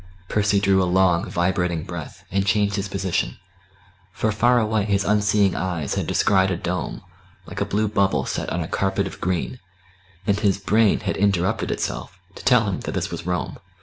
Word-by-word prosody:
Percy 105 -1 +2
drew 95 -1 +3
a - - +2
long 90 -2 +3
vibrating 90 -2 0
breath, 85 -3 -8
and 95 +1 +1
changed 100 0 +1
his 100 -1 -2
position; 95 -10 -2 0.7
for 110 +4 -1
far 120 +4 +3
away 110 -2 +1
his 100 -1 +1
unseeing 105 -2 +2
eyes 85 -6 -2
had - - -2
descried 95 -1 +3
a 95 - -1
dome, 90 +1 -4 0.4
like - - -6
a - - +2
blue 105 +2 0
bubble 95 -10 +1
set - - -3
on 85 - -2
a 80 - -3
carpet 95 +2 0
of 95 0 -8
green; 95 +7 -2 0.7
and 100 0 +1
his 100 -3 +2
brain 105 +3 +2
had 100 -2 -2
interrupted 100 +2 +1
itself 90 - -3 0.2
to - - -11
tell 125 -3 +5
him 95 - -2
that - - -5
this - - -2
was 85 - -6
Rome. 90 -3 -2
95 Hz, 185 wpm, -23 LUFS, 90-105 Hz, 0.7 s, tell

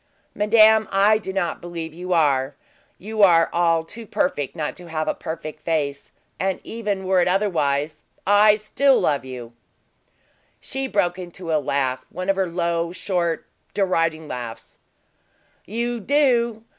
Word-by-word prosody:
"Madame, 215 +1 +5
I 205 +2 +4
do 190 - -6
not 190 -3 -2
believe 170 -2 -6
you 180 +2 -6
are; 140 -5 +2 0.4
you 215 +2 -4
are 170 -4 +5
all 165 -1 +2
too 225 +7 -9
perfect 145 -7 -1
not 150 -3 -3
to 180 -1 -11
have 155 -1 -2
a - - +1
perfect 155 -2 -7
face; 145 -4 -2 0.3
and 190 -1 -1
even 205 -4 -3
were 185 -1 +3
it - - +2
otherwise, 155 -6 0 0.2
I 205 +1 +6
still 255 +6 +2
love 140 -3 0
you!" 125 -2 -8 1.1
She 270 0 -3
broke 185 -6 0
into 175 -2 -5
a 155 - +2
laugh 130 -2 -1
one 185 +3 -1
of - - -2
her 190 -1 0
low, 170 -1 -1
short, 175 -3 -1 0.3
deriding 165 -5 0
laughs. 120 -4 -7 0.9
"You 235 +4 -2
do! 235 -3 +2
175 Hz, 145 wpm, -22 LUFS, 155-210 Hz, 1.1 s, I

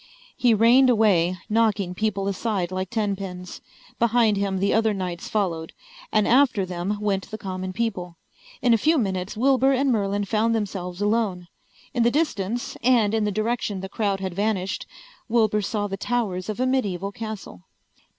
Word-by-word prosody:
He 240 -3 +3
reined 240 +5 +5
away, 190 -6 +3
knocking 215 -4 +1
people 200 0 -1
aside 195 -2 -1
like 185 0 -3
tenpins. 195 -4 -4 0.4
Behind 235 -2 +3
him 195 -1 -1
the 195 +2 +1
other 220 -1 +2
knights 180 -3 -4
followed, 170 -6 -2 0.4
and 210 - +2
after 245 -6 +4
them 180 +3 -3
went 200 -2 -1
the 215 - -5
common 185 -2 -5
people. 185 -5 -3 0.5
In 245 -2 +5
a 230 - +3
few 315 +6 +3
minutes 190 -4 -2
Wilbur 265 +2 +3
and 270 +1 +2
Merlin 205 -2 0
found 225 +2 +1
themselves 190 -3 -3
alone. 205 -5 0 0.4
In 245 - 0
the 235 - +5
distance, 240 - -1
and 230 -4 +3
in 220 -1 +1
the 210 - 0
direction 215 -2 -2
the 190 - -6
crowd 200 -2 -1
had 190 -2 -3
vanished, 195 -1 -2 0.4
Wilbur 220 -2 +2
saw 205 +1 -2
the 195 -1 -4
towers 200 -5 -2
of 215 - -4
a 255 - +2
medieval 200 -8 -1
castle. 210 - -8
205 Hz, 165 wpm, -24 LUFS, 190-230 Hz, 0.5 s, reined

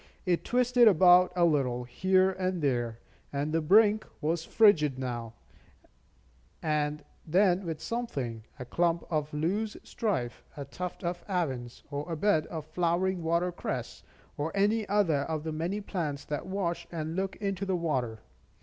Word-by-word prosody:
It 175 -2 +1
twisted 245 -1 +4
about 180 -1 +6
a 175 -1 +4
little, 130 -6 +1
here 185 +9 +2
and 185 -1 -2
there; 120 -4 0 0.3
and 145 +2 -2
the 165 - +2
brink 210 +6 +5 0.2
was 165 +1 -1
fringed 160 - +4
now 120 -3 -4 1.3
and 150 -1 -1 0.2
then 180 +2 +3
with 160 -2 -3
something, 135 - -4
a 125 - -7
clump 170 +5 +1
of 155 -1 -1
loosestrife, 185 - -2
a 140 - -5
tuft 180 +7 -6
of 175 0 -3
avens, 135 -10 -2
or 145 +4 -4
a 165 - -2
bed 180 -3 +2
of 160 -3 -6
flowering 180 +2 0
water 170 +2 +1
cress, 175 - -5 0.4
or 150 +3 -2
any 210 +2 +2
other 195 -8 +3
of 155 -1 -3
the 160 - -3
many 170 +6 -2
plants 155 -8 -3
that 150 +3 -4
wash 185 -3 -2
and 160 -1 -4
look 190 +1 -2
into 200 -2 -3
the 190 -1 0
water. 125 -10 -2
170 Hz, 150 wpm, -29 LUFS, 150-190 Hz, 1.3 s, about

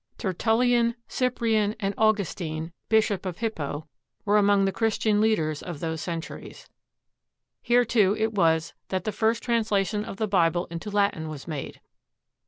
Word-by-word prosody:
Tertullian, 235 +4 +2
Cyprian, 225 -4 0
and 200 -1 -1
Augustine, 175 -7 0 0.2
Bishop 215 -4 +2
of 180 -3 -4
Hippo, 155 -9 -3 0.4
were 210 +1 +4
among 200 -1 +4
the 195 - +1
Christian 210 +1 +1
leaders 160 -9 +1
of 170 -5 -7
those 160 0 -3
centuries. 165 -2 -7 0.9
Here, 245 0 +3
too, 210 -4 +3
it 220 0 0
was 165 -4 +2
that 185 -2 -2
the 215 - -2
first 225 +2 0
translation 210 -4 +1
of 215 - -7
the 220 - -1
Bible 175 -3 +2
into 170 +5 -5
Latin 200 -6 0
was 150 -1 -8
made. 150 -5 -6
205 Hz, 145 wpm, -26 LUFS, 170-220 Hz, 0.9 s, were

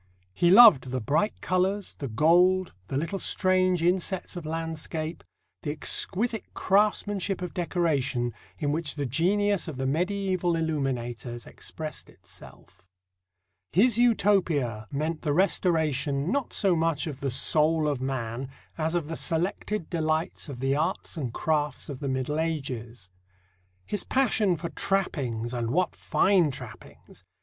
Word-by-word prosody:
He 175 - +3
loved 205 - +9
the 130 0 -2
bright 155 - 0
colours, 190 +2 0
the 140 - -6
gold, 175 +9 +3
the 135 - -2
little 170 +7 -2
strange 185 -2 +2
insets 185 +2 0
of 170 -3 -6
landscape, 160 0 -4 0.4
the 150 - -4
exquisite 210 +8 -1
craftsmanship 200 -1 +1
of 180 - -5
decoration, 145 - 0 0.2
in 145 -2 -1
which 155 0 -1
the 145 -2 -2
genius 190 - +1
of 155 -5 -6
the 130 - -2
medieval 180 +3 0
illuminators 125 -7 -3
expressed 155 -1 -7
itself. - - -15 0.9
His 225 +5 +4
Utopia 170 - +2
meant 155 +3 -2
the 145 - 0
restoration, 155 -4 +1
not 280 -1 -1
so 195 -4 +2
much 165 -3 0
of 145 -5 -6
the 140 - -2
soul 155 +4 +2
of 140 -4 -1
man, 130 -1 -3 0.3
as 160 +2 0
of 170 -4 -1
the 165 - -4
selected 180 +3 -1
delights 160 -1 -1
of 130 -3 -7
the 135 +1 +1
arts 165 +6 -2
and 135 -8 -3
crafts 150 +2 -1
of 135 -3 -6
the 140 - -3
Middle 130 +3 -1
Ages. 125 - -4 0.7
His 205 - -2
passion 220 -9 +2
for 170 +2 -5
trappings 130 - -1
and 120 -2 -2
what 175 +6 0
fine 190 -5 +3
trappings! 135 - -11
160 Hz, 140 wpm, -27 LUFS, 140-185 Hz, 0.9 s, loved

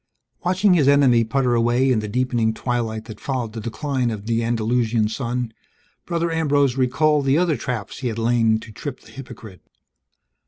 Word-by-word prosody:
Watching 185 +2 +3
his 150 -6 +3
enemy 135 -5 +5
putter 125 +2 0
away 120 +3 +2
in 120 - +2
the 105 - -4
deepening 120 -1 0
twilight 115 -3 -2
that 110 -2 -10
followed 125 -6 -3
the 115 - -6
decline 125 +3 -2
of 105 -3 -5
the 115 0 0
Andalusian 115 -1 +1
sun, 120 0 -3 0.5
Brother 170 -1 -1
Ambrose 145 -5 +2
recalled 140 +3 +2
the 135 +2 +3
other 170 -3 +2
traps 120 -3 -5
he 130 - -2
had 115 -2 -3
lain 115 -1 +2
to 115 - -11
trip 135 +4 -7
the - - -17
hypocrite. 120 -7 -11
120 Hz, 170 wpm, -22 LUFS, 115-140 Hz, 0.5 s, enemy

